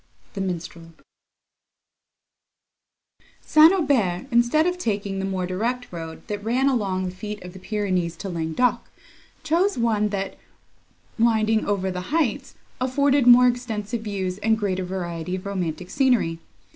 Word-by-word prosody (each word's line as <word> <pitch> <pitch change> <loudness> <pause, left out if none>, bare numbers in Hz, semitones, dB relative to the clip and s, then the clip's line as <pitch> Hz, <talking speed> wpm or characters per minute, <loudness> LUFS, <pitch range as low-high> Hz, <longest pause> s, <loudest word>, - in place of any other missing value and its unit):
THE 195 - -4
MINSTREL 170 -2 -5 2.5
St. 310 +2 +6
Aubert, 255 - +1
instead 240 +7 +3
of 360 0 -1
taking 200 - -2
the 195 - -2
more 190 -2 -2
direct 235 +7 -3
road, 165 -2 -8
that 205 -1 -5
ran 250 +5 +1
along 195 -8 0
the 180 - -3
feet 210 +2 -6
of 180 0 -9
the 190 - -10
Pyrenees 185 -4 -1
to 200 - -6
Languedoc, 170 +8 0 0.5
chose 340 +5 +1
one 220 -3 +1
that, 195 -1 -4 0.8
winding 220 -1 +2
over 190 -2 0
the 180 0 -6
heights, 285 -3 -1 0.2
afforded 270 +1 +2
more 250 +1 +8
extensive 235 -2 -2
views 195 -3 -3
and 220 +1 +2
greater 190 -3 -1
variety 180 -1 -4
of 185 - -7
romantic 180 -3 -4
scenery. 245 - +2
205 Hz, 135 wpm, -24 LUFS, 185-245 Hz, 2.5 s, more